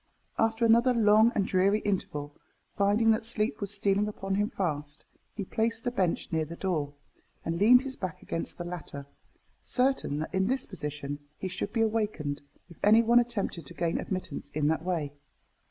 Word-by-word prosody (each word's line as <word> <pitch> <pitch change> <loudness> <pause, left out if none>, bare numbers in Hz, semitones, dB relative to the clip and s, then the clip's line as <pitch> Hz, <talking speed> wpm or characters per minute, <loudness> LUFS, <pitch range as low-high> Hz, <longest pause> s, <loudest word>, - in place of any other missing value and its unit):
After 225 +1 +2
another 235 +2 +5
long 220 +1 +5
and 200 - +2
dreary 195 +3 +3
interval, 150 -7 -3 0.4
finding 205 +3 +3
that 220 0 +1
sleep 215 -1 -1
was 200 - +1
stealing 200 0 +2
upon 195 -2 -4
him 205 +2 +1
fast, 150 - -4 0.3
he 205 - -3
placed 225 +3 -1
the 245 - -1
bench 185 -8 -1
near 160 -1 +1
the 165 +2 -7
door, 155 -7 -2 0.5
and 165 +1 -2
leaned 250 +5 +7
his 270 -1 -4
back 185 -5 -5
against 165 - -4
the 175 - -4
latter, 170 -5 -7 0.6
certain 255 - +1
that 155 +5 -4
in 190 0 +1
this 265 +3 0
position 145 -1 -5 0.2
he 190 - -4
should 185 +2 -4
be 230 - 0
awakened 210 -10 -1 0.3
if 170 - -15
any 220 +3 +6
one 235 +1 +5
attempted 200 - -2
to - - -9
gain 170 -1 0
admittance 185 -6 -5
in 150 -1 +2
that 160 0 0
way. 165 -6 -2
195 Hz, 180 wpm, -29 LUFS, 165-225 Hz, 0.6 s, leaned